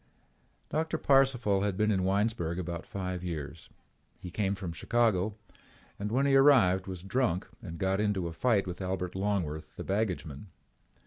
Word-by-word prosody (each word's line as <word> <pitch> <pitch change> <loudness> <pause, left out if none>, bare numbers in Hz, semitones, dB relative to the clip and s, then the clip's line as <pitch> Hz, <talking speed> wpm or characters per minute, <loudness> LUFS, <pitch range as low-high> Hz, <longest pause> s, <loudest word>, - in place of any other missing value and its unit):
Doctor 160 +1 -1
Parcival 125 -8 +3
had 100 -2 -1
been 105 +1 +2
in 95 -3 +1
Winesburg 95 -3 0
about 85 -2 -5
five 90 -2 -4
years. 80 -2 -6 0.5
He 90 - -8
came 100 +1 0
from 95 -4 -5
Chicago 110 -1 +1 0.6
and 105 +1 -3
when 135 +4 +2
he 140 -1 +4
arrived 115 -10 +5
was 90 -2 -6
drunk 95 -3 0
and 85 -4 -7
got 95 +3 0
into 100 -4 0
a 85 - -6
fight 105 +3 +2
with 90 0 -6
Albert 90 -1 -3
Longworth, 85 -6 -2
the - - -6
baggageman. 95 -6 -2
95 Hz, 155 wpm, -30 LUFS, 90-110 Hz, 0.6 s, arrived